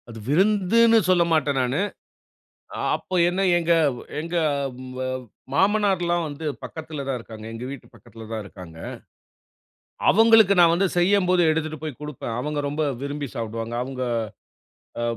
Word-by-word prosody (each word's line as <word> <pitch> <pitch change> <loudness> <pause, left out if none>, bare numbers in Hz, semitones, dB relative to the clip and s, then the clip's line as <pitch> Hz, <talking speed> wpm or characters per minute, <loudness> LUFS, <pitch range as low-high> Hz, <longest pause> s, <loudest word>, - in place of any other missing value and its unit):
அது 115 -1 -9
விருந்துனு 210 +7 +4
சொல்லமாட்டேன் 165 -6 +2
நானு. 130 +7 0 1.1
அப்போ 185 - -5
என்ன 185 +2 -1 0.2
எங்க, 170 0 0 0.5
எங்க 170 +2 -5 1.2
மாமனார்லாம் 190 -2 +2
வந்து 150 +2 -7 0.2
பக்கத்தில 155 -3 -6
தான் 135 -2 -1
இருக்காங்க. 110 -2 -10
எங்க 115 +2 -7
வீட்டு 140 - -9
பக்கத்தில 115 0 -13
தான் 110 -1 -3
இருக்காங்க. 90 -5 -12 1.3
அவங்களுக்கு 220 -1 +6
நான் 170 -1 +6
வந்து 190 +3 +2
செய்யும்போது 180 0 +3
எடுத்துட்டு 155 -1 -2
போய் 155 -5 -6
குடுப்பேன். 135 -6 -5
அவங்க 150 +3 -2
ரொம்ப 150 +2 -1 0.2
விரும்பி 145 0 -4
சாப்பிடுவாங்க. 115 0 -4
அவங்க 130 0 -5 1.0
அ - - -1
155 Hz, 125 wpm, -24 LUFS, 125-185 Hz, 1.3 s, அவங்களுக்கு